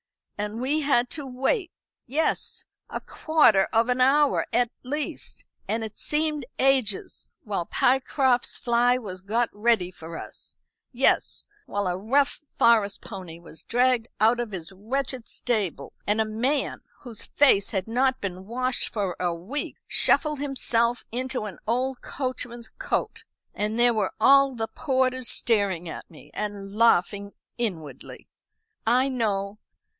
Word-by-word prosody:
And 210 +2 -4
we 275 +5 +1
had 255 -4 +2
to 290 -3 -5
wait 275 - -1 0.4
yes, 300 +6 0 0.2
a - - -4
quarter 265 -12 +3
of 225 +1 +3
an 250 +1 +1
hour, 280 +2 +4
at 245 -1 +2
least, 295 +4 -5 0.2
and 225 0 -1
it 220 -1 -7
seemed 300 -1 0
ages, 260 -7 0
while 195 -5 -3
Pycroft's 260 -1 +2
fly 240 +1 +2
was 190 -7 -7
got 230 +5 0
ready 210 -4 +2
for 165 -1 -9
us; - - -10 0.3
yes, 265 +1 +1 0.2
while 205 0 -1
a 180 -1 0
rough 270 +9 +1 0.2
forest 215 -4 +3
pony 185 -6 -8
was 165 -2 -12
dragged 245 -1 +2
out 225 +3 +4
of 240 -2 -2
his 185 -3 -7
wretched 245 +5 -4
stable, 205 - -1
and 210 +2 +2
a 220 - +3
man, 250 +6 -1 0.2
whose 240 -4 -6
face 260 -9 +4
had 190 -2 -2
not 260 +3 +1
been 190 -1 -6
washed 255 +2 0
for 195 -5 -2
a 180 -1 0
week, 185 +13 -4
shuffled 300 -2 +3
himself 245 -4 0
into 255 -1 -2
an 200 -4 -8
old 255 +3 0
coachman's 245 -3 -5
coat. 445 - -2 0.3
And 210 +2 -2
there 240 0 +5
were 210 -4 -1
all 275 -1 +5
the 225 -1 -1
porters 260 -3 0
staring 200 -7 +1
at 160 - -8
me, 160 - -16
and 200 -1 -5
laughing 200 -2 +2 0.3
inwardly, 170 -11 -5 0.6
I 250 +3 +4
know. 210 -5 -1
235 Hz, 140 wpm, -25 LUFS, 205-260 Hz, 0.6 s, there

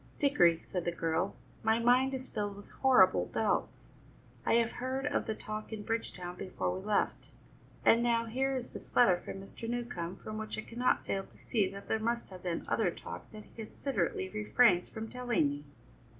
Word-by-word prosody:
"Dickory," 175 - +4
said 180 -2 -3
the 175 - 0
girl, 165 +3 -1 0.3
"my 220 0 +3
mind 250 +3 +4
is 260 0 -6
filled 205 -2 -3
with 205 - -13
horrible 185 - +6
doubts. - - -1 0.6
I - - +5
have 230 -1 +3
heard 260 +2 -3
of 290 - 0
the 220 - -1
talk 215 +1 -6
in 215 -1 -5
Bridgetown 185 -6 -3
before 180 -1 -2
we 190 - -6
left, 210 0 0 0.6
and 230 - +6
now 235 -1 +2
here 265 +4 0
is 250 -1 -5
this - - -10
letter 190 -8 +6
from - - -6
Mr. 195 +4 -7
Newcombe 235 -8 -3
from 215 +2 -6
which 220 0 -4
I - - -2
cannot 240 +3 0
fail 195 -1 -1
to - - -20
see 205 -5 +1
that 200 +1 -9
there 220 - +1
must 235 +2 -1
have 185 -1 -9
been 175 -2 -2
other - - +2
talk - - -8
that 215 -1 -9
he - - -20
considerately 205 -6 -2
refrains 210 -2 +3
from 220 0 -6
telling 245 -10 +1
me." 145 +1 -5
215 Hz, 195 wpm, -32 LUFS, 185-240 Hz, 0.6 s, horrible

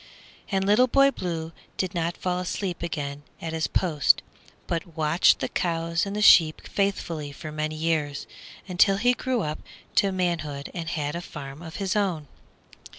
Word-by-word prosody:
And 195 -1 0
Little 210 +6 +5
Boy 275 +2 +5
Blue 165 -7 -4 0.3
did 185 -2 -1
not 170 -1 -1
fall 180 -1 -1
asleep 180 0 -3
again 145 -4 -4 0.2
at 165 -1 -5
his 160 -1 0
post, 155 -7 +3 0.4
but 170 -1 -4
watched 155 +2 +4
the - - 0
cows 170 +1 -1
and 200 - -4
the 210 - 0
sheep 160 -5 +6
faithfully 170 -7 -2
for 155 +2 -8
many 155 0 -3
years, 155 -3 -1 0.4
until 195 +2 +4
he 245 +4 +3
grew 250 -1 -1
up 150 0 -3 0.4
to 195 - +4
manhood 170 -6 -2
and 165 -2 -4
had 150 -1 -2
a 170 - -3
farm 140 -3 -8
of 165 -2 -9
his 195 -1 -1
own. 180 -8 0
170 Hz, 165 wpm, -26 LUFS, 155-190 Hz, 0.4 s, sheep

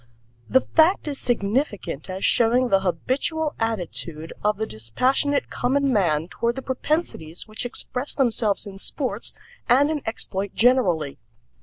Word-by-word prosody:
The 260 - +5
fact 325 +2 +3
is 285 -2 -3
significant 205 - -1
as 185 +1 -2
showing 245 +2 +4
the 195 - +4
habitual 260 - -1
attitude 175 -7 -3
of 210 0 +2
the 220 - -1
dispassionate 255 - 0
common 275 +1 +1
man 165 -6 +2
toward 235 +5 -1
the 265 - -5
propensities 260 - -2
which 215 +3 -3
express 250 +2 -3
themselves 230 -6 +1
in 195 -1 -9
sports 260 +5 -1 0.3
and 280 +5 +5
in 300 -2 -2
exploit 200 -3 -3
generally. 180 - +3
230 Hz, 135 wpm, -24 LUFS, 190-265 Hz, 0.3 s, The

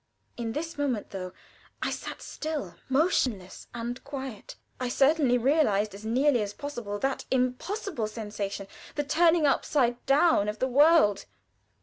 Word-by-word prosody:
In 230 -2 -4
this 320 +1 -5
moment, 255 -7 -1
though 185 -2 -5 0.5
I - - 0
sat - - -6
still, 300 - -4 0.2
motionless, 255 - 0
and 240 +1 -5
quiet, 270 -5 -7 0.2
I 250 -1 -2
certainly 270 -1 +3
realized 230 -6 +2
as 200 +2 -10
nearly 250 +3 +2
as 205 -1 -3
possible 240 -8 -5
that 270 +5 -2
impossible 260 - -1
sensation, 210 -2 -5 0.3
the 295 - 0
turning 325 +2 +3
upside 250 -3 +1
down 275 -7 +4
of 210 - -4
the 260 - 0
world. 275 - +4
255 Hz, 135 wpm, -28 LUFS, 215-290 Hz, 0.5 s, down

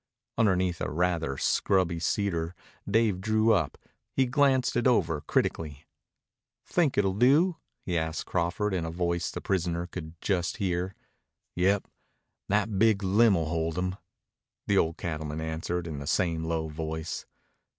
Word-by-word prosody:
Underneath 95 -5 +2
a - - -1
rather 80 -4 0
scrubby 90 -3 +1
cedar 85 -2 -1 0.3
Dave 105 -3 +2
drew 110 +2 +3
up. 80 -8 0 0.4
He 135 - +4
glanced 130 -1 +2
it 120 +1 +2
over 85 -11 +2
critically. 75 -1 -1 0.8
"Think 165 -6 +1
it'll 100 -2 +3
do?" 145 - +4 0.3
he 90 -2 0
asked 80 0 -3
Crawford 90 +4 -1
in 90 -3 0
a 80 - -3
voice 85 0 -1
the - - -6
prisoner 85 -2 -1
could 85 -2 -8
just 90 -3 -1
hear. 90 0 -1 0.6
"Yep. 95 +3 +2 0.6
That 105 0 +1
big 110 -2 +4
limb'll 95 -3 +4
hold 80 +1 -2
him," 90 0 -1 0.7
the 100 - +2
old 80 0 0
cattleman 75 -2 -4
answered 80 +2 -3
in 80 -4 -5
the 70 - -7
same 80 -1 +1
low 80 -1 -1
voice. 80 +1 -5
90 Hz, 140 wpm, -28 LUFS, 80-100 Hz, 0.8 s, He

